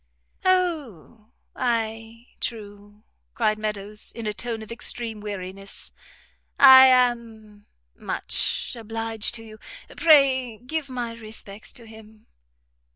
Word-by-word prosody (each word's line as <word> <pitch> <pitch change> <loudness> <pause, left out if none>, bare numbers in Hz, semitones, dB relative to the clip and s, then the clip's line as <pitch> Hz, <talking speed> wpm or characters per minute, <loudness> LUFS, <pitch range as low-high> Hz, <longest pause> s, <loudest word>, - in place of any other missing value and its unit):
"O, 290 - -1 0.3
ay, 225 -1 -3
true," 205 -2 -7 0.3
cried 215 0 +1
Meadows, 210 0 -4
in 230 - -7
a 210 - -2
tone 225 0 -5
of 220 - -12
extreme 230 -1 -1
weariness, 195 -1 -8 0.7
"I 265 -1 +10
am 230 -5 0 0.3
much - - -2
obliged 225 0 -1
to 225 - -9
you. 215 -1 -13 0.4
Pray 270 -7 +4
give 285 +5 -5
my 245 -2 -4
respects 215 -2 -6
to 235 - -12
him." 220 -1 -15
225 Hz, 105 wpm, -24 LUFS, 215-245 Hz, 0.7 s, I